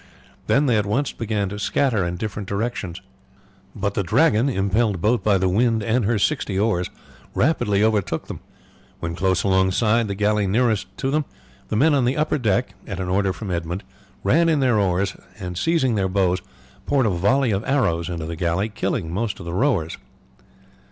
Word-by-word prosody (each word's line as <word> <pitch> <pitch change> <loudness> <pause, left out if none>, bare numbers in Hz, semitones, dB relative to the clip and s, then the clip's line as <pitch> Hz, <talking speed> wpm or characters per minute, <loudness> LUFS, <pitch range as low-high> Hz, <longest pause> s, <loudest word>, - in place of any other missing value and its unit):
Then 140 +2 +3
they 120 -5 +3
at 105 - -2
once 130 +7 0
began 105 -3 -2
to 100 +1 -6
scatter 115 -2 +1
in 85 0 -4
different 105 -1 -5
directions; 100 -4 -3 0.7
but 100 -1 -2
the 100 - 0
Dragon, 115 - +3
impelled 100 -2 +1
both 115 +6 +2
by 105 -2 +3
the 95 0 +1
wind 110 +3 +2
and 115 +1 +1
her 115 +2 +1
sixty 105 -4 0
oars, 100 -4 +1 0.5
rapidly 105 -8 +2
overtook 105 -7 0
them. - - -7 0.6
When 85 0 -3
close 95 +1 +1
alongside 100 +4 +2
the 100 - -3
galley 105 0 +1
nearest 110 +1 +1
to 135 - -1
them 150 0 +1 0.4
the - - -3
men 150 +8 +4
on 135 -3 +2
the 130 +4 0
upper 155 0 +1
deck, 120 +1 0
at 95 -3 -5
an 90 -1 -3
order 95 +1 +1
from 100 0 -6
Edmund, 85 +2 -3 0.4
ran 165 +1 +3
in 155 -3 +2
their 125 -5 +3
oars, 100 0 0 0.2
and 90 -1 -5
seizing 135 - +1
their 95 -3 0
bows 90 -1 +1 0.5
poured 140 -3 +2
a - - +3
volley 120 +8 +2
of 100 +1 -1
arrows 85 - +1
into 85 -3 -4
the 85 +1 -5
galley, 85 +5 0
killing 95 -5 -2
most 105 +1 -2
of - - -8
the 85 - -5
rowers. 95 - 0
105 Hz, 185 wpm, -22 LUFS, 95-120 Hz, 0.7 s, men